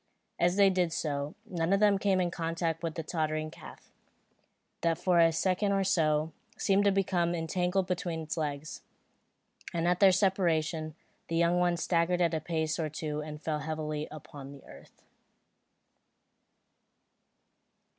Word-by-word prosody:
As 175 +1 +3
they 200 -1 +5
did 180 -3 +1
so, 145 +1 -3
one 175 -5 -2
of 195 - +4
them 205 -2 +4
came 195 -2 +2
in 175 -1 0
contact 165 -1 -2
with 165 -2 -3
the 165 - -4
tottering 155 -1 -2
calf, - - -13 0.9
that 165 -1 +1
for 180 -2 +2
a 165 0 +6
second 190 +4 +1
or 195 0 +2
so, 160 -4 +1 0.3
seemed 200 -1 +2
to 200 - +5
become 180 -3 +1
entangled 180 +3 0
between 175 -2 -3
its 155 - -4
legs; 150 -2 -4 0.9
and 170 0 0
at 180 0 +2
their 195 -2 +7
separation, 165 -5 +1 0.3
the 165 - -3
young 170 +1 +3
one 175 -1 +2
staggered 170 +1 +1
a 165 -3 +1
pace 160 0 -2
or 155 -2 -1
two 150 0 -4
and 150 0 -8
fell 155 -2 -1
heavily 155 0 -3
upon 140 -2 -10
the 140 - -14
earth. - - -16
165 Hz, 150 wpm, -30 LUFS, 155-180 Hz, 0.9 s, their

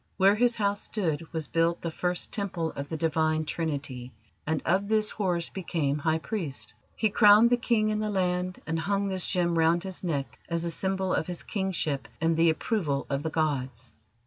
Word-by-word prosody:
Where 195 +1 +6
his 240 +2 +2
house 205 -1 0
stood 165 -6 -2
was 160 -2 -1
built 165 +1 +1
the 165 - -2
first 180 +2 -2
Temple 180 -6 -2
of 140 0 -6
the 160 - -3
Divine 155 0 +1
Trinity, 140 -6 -4 0.4
and 155 0 +1
of 190 +4 +2
this 215 0 +2
Horus 180 -5 -1
became 155 -6 -1
High 160 +1 +1
Priest. 160 - -5 0.2
He 220 -2 +1
crowned 210 +2 +7
the 245 - +5
King 230 -3 +1
in 215 0 0
the 215 0 -1
land, 180 -2 -1
and 165 0 -1
hung 200 +3 0
this 190 -2 -1
gem 170 -2 +1
round 165 +1 +3
his 190 -1 -6
neck 145 -6 -3
as 170 0 -1
the 170 - -1
symbol 190 +1 -1
of - - 0
his 180 -1 -4
kingship 165 - -2
and 165 +1 +2
the 165 +1 +4
approval 160 -4 -1
of 140 0 0
the 160 - -2
gods. 130 -6 -2
170 Hz, 195 wpm, -28 LUFS, 155-195 Hz, 0.4 s, crowned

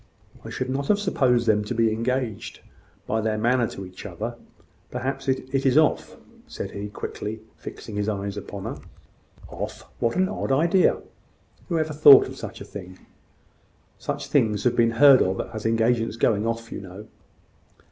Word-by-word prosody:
"I - - -8
should 130 0 -3
not 140 +1 -2
have 210 - +4
supposed 130 - +1
them 105 -2 +3
to 115 +4 -4
be 115 -1 +2
engaged, 115 -2 -3 0.4
by 110 +1 -1
their 110 0 -1
manner 120 +2 +2
to 95 - -8
each 90 0 -11
other. - - -5 0.5
Perhaps 135 +2 -4
it 130 0 -2
is 135 0 +3
off," 155 -1 +2 0.3
said - - -6
he, 100 +1 -6
quickly, 110 +1 -6
fixing 105 -2 -8
his 105 +1 0
eyes 100 -1 -3
upon 100 -1 -7
her. - - -5 0.7
"Off! - - -6 0.2
What 115 - 0
an 185 +1 +2
odd 195 - -3
idea! 170 +7 +3 0.7
Who 170 - 0
ever 155 -1 -1
thought 145 -2 +9
of 130 - -8
such 110 -2 -8
a - - -7
thing?" 95 -2 -10 1.0
"Such - - -4
things 105 -2 +1
have 120 -1 +2
been 115 -1 +4
heard 140 0 +8
of 95 +1 0
as 110 0 -3
engagements 115 0 +1
going 110 -2 +2
off, 115 0 -4
you - - -5
know." 95 +2 -10
115 Hz, 170 wpm, -24 LUFS, 105-135 Hz, 1.0 s, thought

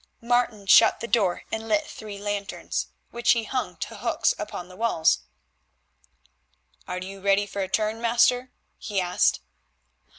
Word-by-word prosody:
Martin 235 -3 0
shut 225 +3 +6
the 235 - -5
door 200 -7 +1
and 220 0 -4
lit 305 +7 +2
three 210 -6 -9
lanterns, 205 0 -3 0.2
which 235 0 +3
he 230 -1 -1
hung 255 +3 -3
to - - -6
hooks - - +1
upon 175 - -6
the 180 - -13
wall. 205 -7 -2 1.8
"Are 180 - -3
you 190 +1 -7
ready 200 +1 +3
for 200 0 -5
a 190 - -1
turn, 215 +3 -1
master?" 245 +2 +3 0.3
he 205 -3 -2
asked. 175 - +2
215 Hz, 145 wpm, -25 LUFS, 195-235 Hz, 1.8 s, shut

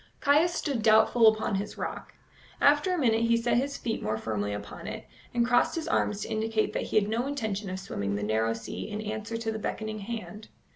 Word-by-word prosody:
Caius 300 +5 +4
stood 275 -9 -1
doubtful 220 +1 +5
upon 220 -1 +3
his 200 +1 -3
rock. - - -5 0.4
After 295 +5 +4
a 365 - +1
minute 230 -7 +2
he 230 0 +4
set 235 +1 +1
his 280 +3 -1
feet 225 -2 -3
more 110 +1 -1
firmly 105 -2 -2
upon 100 0 -7
it, - - -6 0.3
and 240 -1 +2
crossed 245 0 +3
his 325 -1 -3
arms 210 -10 0
to - - -3
indicate 220 0 0
that - - -1
he - - -4
had 210 -1 +4
no 230 +4 -1
intention 220 -8 -3
of 185 0 -4
swimming 100 - -3
the 105 - -3
narrow 110 +2 +1
sea 115 - -6
in 210 0 -4
answer 215 +1 -4
to 225 -1 -2
the 220 - -4
beckoning 215 0 -4
hand. 215 0 -6
220 Hz, 215 wpm, -28 LUFS, 200-240 Hz, 0.4 s, doubtful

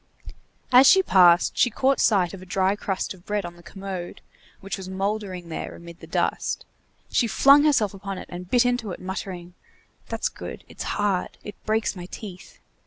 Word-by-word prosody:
As 255 +2 +8
she 380 0 +7
passed, 175 - +5
she 245 - +4
caught 265 +4 +1
sight 190 -5 +3
of 195 - -9
a - - -10
dry 190 +2 +1
crust 195 -2 -3
of 180 -2 -17
bread 205 -1 -2
on 175 0 -8
the 175 - -16
commode, 185 0 -7 0.4
which 195 0 -5
was 190 -1 -8
moulding 190 -2 -3
there 160 - -5
amid 170 0 -12
the - - -12
dust; - - -1 0.5
she 235 - +2
flung 280 +7 +6
herself 230 -10 +3
upon 195 0 -6
it - - -7
and 180 0 -8
bit 245 +2 +4
into 245 -3 0
it, - - -9
muttering:— 185 -2 -6 0.6
"That's - - -1
good! - - -8
it's - - -5
hard! 200 -3 -1
it 210 - -7
breaks 220 -1 0
my 175 -1 -8
teeth!" 190 -2 -10
195 Hz, 185 wpm, -24 LUFS, 180-215 Hz, 0.6 s, As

